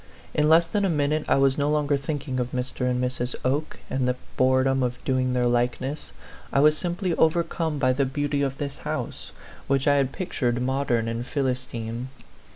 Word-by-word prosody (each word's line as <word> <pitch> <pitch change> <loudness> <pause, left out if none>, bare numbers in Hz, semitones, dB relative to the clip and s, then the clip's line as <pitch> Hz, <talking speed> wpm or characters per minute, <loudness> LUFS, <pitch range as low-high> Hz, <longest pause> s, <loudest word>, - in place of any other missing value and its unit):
In 150 0 +2
less 165 +1 +6
than 205 +4 -1
a 195 - +2
min 145 -3 +1
ute 155 0 -1
I - - +5
was 135 0 +3
no 145 +1 +2
longer 150 -1 +2
thinking 140 -2 -3
of 125 0 -2
Mr. 125 0 -2
and 125 0 0
Mrs. 125 0 -2
Oke 145 +4 -1
and 130 -1 -1
the 125 - +1 0.2
boredom 130 +1 +3
of 125 -1 -1
doing 130 -1 +1
their 125 -1 +1
likeness 125 +4 -1 0.4
I - - +2
was 150 +2 +6
simply 175 +2 -2
overcome 160 -1 +1
by 130 -2 +3
the 135 +1 +1
beauty 145 +2 -1
of 135 -1 -1
this 140 -1 -4
house, - - -5 0.4
which 135 0 +1
I 145 0 +5
had 135 -1 +1
pictured 125 -9 -1
modern 125 -3 0
and 115 +1 -2
Philistine. 125 -3 -3
135 Hz, 190 wpm, -25 LUFS, 125-150 Hz, 0.4 s, less